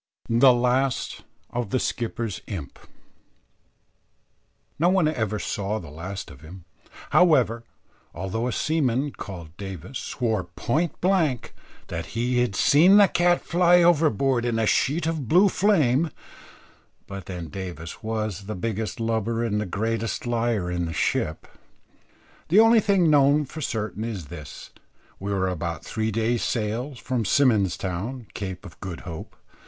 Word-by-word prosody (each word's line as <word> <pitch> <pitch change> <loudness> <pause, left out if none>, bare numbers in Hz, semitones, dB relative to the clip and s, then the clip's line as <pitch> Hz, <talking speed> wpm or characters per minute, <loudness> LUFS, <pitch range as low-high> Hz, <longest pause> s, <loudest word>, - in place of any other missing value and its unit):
THE 120 +3 +6
LAST 125 +2 0 0.3
OF 120 -3 -3
THE 130 - +1
SKIPPER'S 115 -4 -3
IMP. 85 -9 -7 2.0
No 170 +3 +4
one 185 -4 +3
ever 110 -8 -1
saw 100 +1 -2
the 80 -8 -9
last 90 +3 -7
of 65 -2 -14
him, 85 +3 -12 0.5
however; 125 -10 +4 0.5
although 110 +6 -3
a - - -1
seaman, 145 -2 0
called 85 -9 -9
Davis, 100 - -7
swore 110 -7 -2
point 145 - -2
black, 170 -10 +1 0.4
that 85 -1 -4
he 125 +1 +1
had 120 -5 0
seen 170 - +6
the 205 -1 +7
cat 175 0 +2
fly 175 0 +4
overboard 140 - +3
in 120 -2 0
a 110 - +1
sheet 150 +9 +1
of 160 -6 -2
blue 180 - +5
flame; 165 - +2 1.0
but 100 -2 -8
then 90 -4 -6
Davis 85 0 -7
was 110 -3 -3
the 110 - -4
biggest 110 +3 -3
lubber 115 0 -1
and 105 -2 0
the 105 - -3
greatest 115 +5 -2
liar 115 -6 0
in 85 -1 -1
the 80 - -4
ship. 75 0 -1 1.0
The 185 +7 +5
only 225 +1 +7
thing 195 -6 +3
known 145 +1 +4
for 155 +4 -8
certain 110 -5 -3
is 100 -10 -5
this: 75 -4 -9 0.5
we 100 +1 -4
were 95 -2 +1
about 85 -3 -4
three 110 0 -2
days' 115 +2 0
sail 120 +5 -2
from 125 0 -2
Symon's 110 -5 +3
Town, 105 +8 -4
Cape 95 -1 -6
of 85 -6 -12
Good 90 -3 -6
Hope. 80 -3 -8
115 Hz, 145 wpm, -25 LUFS, 95-140 Hz, 2.0 s, the